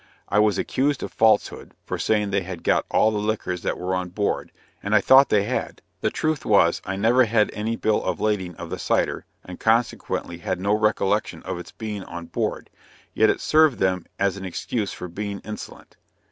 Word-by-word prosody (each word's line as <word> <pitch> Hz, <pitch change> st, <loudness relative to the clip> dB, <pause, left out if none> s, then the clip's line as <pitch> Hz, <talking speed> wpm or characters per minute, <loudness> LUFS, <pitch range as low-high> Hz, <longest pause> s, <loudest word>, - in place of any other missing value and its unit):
I 105 Hz, -, +3 dB
was 105 Hz, -3 st, +3 dB
accused 140 Hz, +1 st, 0 dB
of -, -, -6 dB
falsehood, 110 Hz, -2 st, +1 dB
for -, -, -4 dB
saying 105 Hz, -2 st, +1 dB
they 95 Hz, 0 st, +1 dB
had 90 Hz, -2 st, -7 dB
got -, -, +2 dB
all 110 Hz, -, +3 dB
the 105 Hz, -, -1 dB
liquors 105 Hz, -4 st, -2 dB
that -, -, -2 dB
were 90 Hz, +1 st, -3 dB
on 90 Hz, -1 st, -2 dB
board, 100 Hz, +3 st, -2 dB, 0.3 s
and 100 Hz, +2 st, 0 dB
I -, -, +7 dB
thought 135 Hz, +7 st, +6 dB
they 100 Hz, -2 st, +3 dB
had; 120 Hz, +5 st, -3 dB, 0.2 s
the -, -, +1 dB
truth 155 Hz, -2 st, -1 dB
was, 100 Hz, -5 st, +3 dB
I 95 Hz, -, -3 dB
never 120 Hz, +6 st, +4 dB
had 110 Hz, -1 st, +2 dB
any 110 Hz, +2 st, -2 dB
bill 110 Hz, -2 st, 0 dB
of -, -, -2 dB
lading 95 Hz, -5 st, -1 dB
of -, -, -8 dB
the -, -, -4 dB
cider, -, -, 0 dB, 0.2 s
and 90 Hz, -, -9 dB
consequently 110 Hz, -6 st, 0 dB
had 85 Hz, -, -3 dB
no 100 Hz, +2 st, +1 dB
recollection 105 Hz, -1 st, 0 dB
of 85 Hz, -, -4 dB
its 90 Hz, -, -10 dB
being 105 Hz, -3 st, -6 dB
on 85 Hz, -1 st, -7 dB
board; -, -, -3 dB, 0.4 s
yet -, -, +4 dB
it -, -, 0 dB
served 155 Hz, -4 st, +4 dB
them 95 Hz, -2 st, 0 dB
as 100 Hz, 0 st, 0 dB
an 95 Hz, -, -7 dB
excuse 100 Hz, +3 st, -3 dB
for 90 Hz, -, -7 dB
being 100 Hz, +3 st, -5 dB
insolent. 105 Hz, 0 st, -9 dB
105 Hz, 200 wpm, -23 LUFS, 95-110 Hz, 0.4 s, I